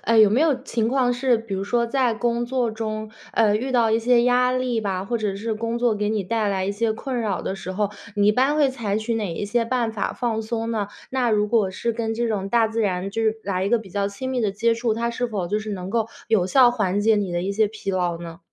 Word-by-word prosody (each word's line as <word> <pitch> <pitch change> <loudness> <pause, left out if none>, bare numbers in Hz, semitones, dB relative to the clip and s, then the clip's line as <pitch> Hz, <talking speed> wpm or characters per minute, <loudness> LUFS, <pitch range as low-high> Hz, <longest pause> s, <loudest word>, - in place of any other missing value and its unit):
哎， 230 - +2
有 215 -2 +7
没 240 - +2
有 315 -2 +4
情 230 -5 -1
况 250 -1 +2
是 245 -1 +2
比 225 -2 -8
如 195 0 -2
说 235 +3 +1
在 250 -2 +1
工 235 +1 -1
作 250 -2 0
中， 215 -1 -4 0.2
呃， 210 -2 +3
遇 260 +4 -3
到 235 -3 +3
一 220 - +3
些 240 +1 +3
压 250 +1 +3
力 255 -3 0
吧， 190 -3 -2
或 235 +3 -1
者 210 -2 -1
是 220 +3 -3
工 230 +2 -2
作 240 -2 +2
给 210 0 -1
你 215 -1 0
带 220 +3 -1
来 190 -1 0
一 195 - -1
些 220 +2 0
困 250 +2 -3
扰 205 -5 -2
的 - - -3
时 185 -1 -6
候， 205 +1 -1 0.2
你 205 -1 +3
一 - - +5
般 265 +6 +2
会 290 -3 +4
采 225 -6 -2
取 220 +2 -1
哪 205 -6 -2
一 205 - -3
些 230 +3 0
办 235 -2 -1
法 210 - -2
放 230 -3 -1
松 225 +1 -3
呢？ 215 -3 -1 0.2
那 255 -3 +1
如 210 -1 +2
果 215 -4 +2
是 230 +5 -2
跟 225 0 -2
这 235 +1 -1
种 200 -3 -2
大 225 +1 +3
自 225 +1 -2
然 190 -2 -1
就 225 +3 -2
是 220 0 +2
来 190 -1 -1
一 195 - 0
个 240 - +4
比 210 -4 -11
较 200 +1 0
亲 260 +6 -5
密 255 - -1
的 210 -3 0
接 230 +3 +2
触， 230 -1 0
它 235 +1 -1
是 245 +1 -2
否 200 -7 -3
就 210 - 0
是 215 0 -5
能 185 -1 -5
够 225 0 0 0.2
有 210 -5 +3
效 250 +4 +6
缓 205 -5 0
解 220 +1 +4
你 200 -4 -1
的 175 0 -1
一 195 - -1
些 215 +2 +2
疲 210 -1 -5
劳 180 -2 0
呢？ 165 -1 -8
220 Hz, 300 characters per minute, -23 LUFS, 205-235 Hz, 0.2 s, 有